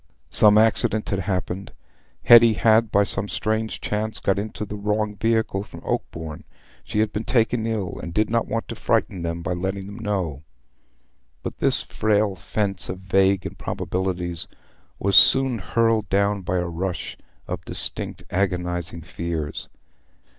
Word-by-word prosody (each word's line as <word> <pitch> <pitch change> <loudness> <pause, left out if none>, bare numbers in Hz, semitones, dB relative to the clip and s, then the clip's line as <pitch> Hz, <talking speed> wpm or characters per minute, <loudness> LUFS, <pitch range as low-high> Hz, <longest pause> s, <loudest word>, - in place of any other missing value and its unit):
Some 105 0 +6
accident 110 0 +2
had 100 - -1
happened. 95 0 -3 0.5
Hetty 115 -1 +8
had, 110 0 +3
by 100 - +4
some 100 0 -2
strange 110 +3 -2
chance, 110 +1 -3
got 100 0 +1
into 105 0 -5
a 105 - -6
wrong 105 +1 -1
vehicle 110 -2 0
from 85 -5 -11
Oakbourne: 80 -1 -4 0.4
she 105 - -1
had 110 -1 0
been 105 - -2
taken 115 -2 +1
ill, 110 -5 -3
and 85 - -6
did 105 +5 +1
not 115 0 0
want 115 0 -3
to - - -4
frighten 90 - 0
them 85 0 -3
by 90 - -1
letting 95 +2 -3
them 100 +3 -9
know. 95 -10 -2 1.0
But - - -6
this - - +2
frail 105 -1 +1
fence 100 0 -3
of 90 - -4
vague 95 0 +2
improbabilities 90 -2 -3 0.5
was 100 0 0
soon 130 -3 +7
hurled 110 +1 +1
down 100 +1 +1
by 90 0 -1
a 90 - 0
rush 90 +2 -4 0.3
of - - -4
distinct - - -1
agonizing 90 -3 -2
fears. 85 -3 -5
100 Hz, 150 wpm, -23 LUFS, 90-110 Hz, 1.0 s, Hetty